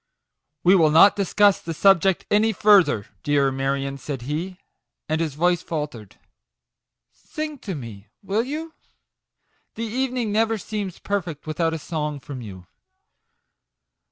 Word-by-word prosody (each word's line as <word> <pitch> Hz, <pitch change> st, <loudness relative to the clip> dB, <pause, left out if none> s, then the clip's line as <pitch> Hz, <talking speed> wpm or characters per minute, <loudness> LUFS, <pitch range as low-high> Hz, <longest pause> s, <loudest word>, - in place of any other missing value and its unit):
" 145 Hz, +1 st, -57 dB
We 180 Hz, -, +6 dB
will 160 Hz, -4 st, +5 dB
not 165 Hz, +6 st, +6 dB
discuss 200 Hz, 0 st, +3 dB
the 165 Hz, -1 st, -5 dB
subject 195 Hz, 0 st, +3 dB
any 220 Hz, +2 st, +3 dB
fur 205 Hz, 0 st, +6 dB
ther, 105 Hz, -, -3 dB, 0.2 s
dear 140 Hz, -2 st, +2 dB
Marion/' 135 Hz, +1 st, -2 dB
said 135 Hz, -1 st, -6 dB
he, 165 Hz, +7 st, -4 dB, 0.5 s
and 155 Hz, +1 st, -1 dB
his 155 Hz, -4 st, -2 dB
voice 175 Hz, +2 st, +2 dB
faltered. 150 Hz, -, -6 dB, 0.6 s
" -, -, -61 dB
Sing 305 Hz, -2 st, -6 dB
to 195 Hz, -6 st, -5 dB
me, 110 Hz, -7 st, -9 dB, 0.2 s
will 200 Hz, +3 st, 0 dB
you? 315 Hz, +5 st, -6 dB, 1.0 s
The 230 Hz, -, -3 dB
even 255 Hz, +3 st, -2 dB
ing 230 Hz, -4 st, -1 dB
never 225 Hz, +1 st, +1 dB
seems 205 Hz, -3 st, -5 dB
perfect 175 Hz, -7 st, -4 dB
without 160 Hz, +1 st, -1 dB
a -, -, -3 dB
song 150 Hz, -2 st, -4 dB
from 135 Hz, -1 st, -8 dB
you." 95 Hz, -5 st, -10 dB
165 Hz, 150 wpm, -23 LUFS, 145-205 Hz, 1.0 s, We